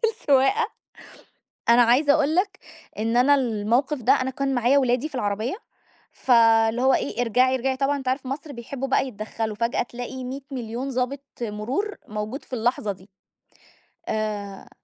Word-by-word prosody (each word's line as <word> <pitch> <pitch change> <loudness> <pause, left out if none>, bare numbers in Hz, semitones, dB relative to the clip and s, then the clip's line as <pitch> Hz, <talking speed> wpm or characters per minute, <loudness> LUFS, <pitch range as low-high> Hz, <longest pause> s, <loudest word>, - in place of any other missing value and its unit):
في - - +5
السواقة، 290 - +3 1.0
أنا 240 +1 +7
عايزة 280 +5 +4
أقول 310 0 +2
لك 375 +1 0 0.4
إن 225 +2 0
أنا 280 +3 +5
المَوقِف 245 +3 0
ده 235 - +5
أنا 255 +1 0
كان 275 0 -1
معايا 245 +3 +3
ولادي 255 +3 +1
في 270 - -10
العربية 215 - -1 0.6
فاللي 225 -1 +4
هو 265 0 +4
إيه، 245 - -1
ارجَعي 250 +3 +3
ارجَعي 260 +1 -1
طبعًا 280 +1 +1
أنت 265 -2 -8
عارف 260 +1 -1
مصر 280 +3 -5
بيحبّوا 260 +2 -5
بقى 270 0 +1
يتدخّلوا، 215 -1 -4
فجأة 230 +3 0
تلاقي 245 +2 -7
100 260 +2 -5
مليون 245 +1 -4
ضابط 260 +2 -2 0.2
مرور 240 - -3
موجود 215 +6 -5
في - - -15
اللحظة 230 -3 0
دي، 190 +1 -13 1.0
آآ 210 -2 -4
250 Hz, 160 wpm, -24 LUFS, 225-275 Hz, 1.0 s, أنا